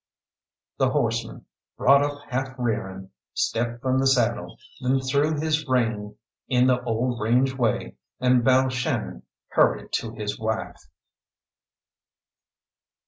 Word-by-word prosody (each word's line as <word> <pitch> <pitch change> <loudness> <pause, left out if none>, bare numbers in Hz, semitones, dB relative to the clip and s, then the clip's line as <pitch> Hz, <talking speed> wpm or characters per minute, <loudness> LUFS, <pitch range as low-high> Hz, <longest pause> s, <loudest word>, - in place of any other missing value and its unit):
The - - +3
horseman, - - -2 0.3
brought 140 +2 +5
up 145 0 -4
half 130 0 -3
rearing, 95 -6 -3 0.2
stepped 120 +1 -1
from 130 0 +2
the 135 - +2
saddle, 120 -3 +1 0.2
then 130 +1 +2
threw 145 +4 +1
his 155 -1 0
rein 115 -5 0 0.3
in 125 -1 +3
the 125 -1 +3
old 120 +1 -1
range 125 +4 +2
way, 120 -4 -1 0.2
and 125 -1 +3
Balshannon 130 0 +1 0.3
hurried - - +2
to 115 -1 -3
his 105 -1 -4
wife. 110 0 -4
125 Hz, 115 wpm, -25 LUFS, 115-130 Hz, 0.3 s, brought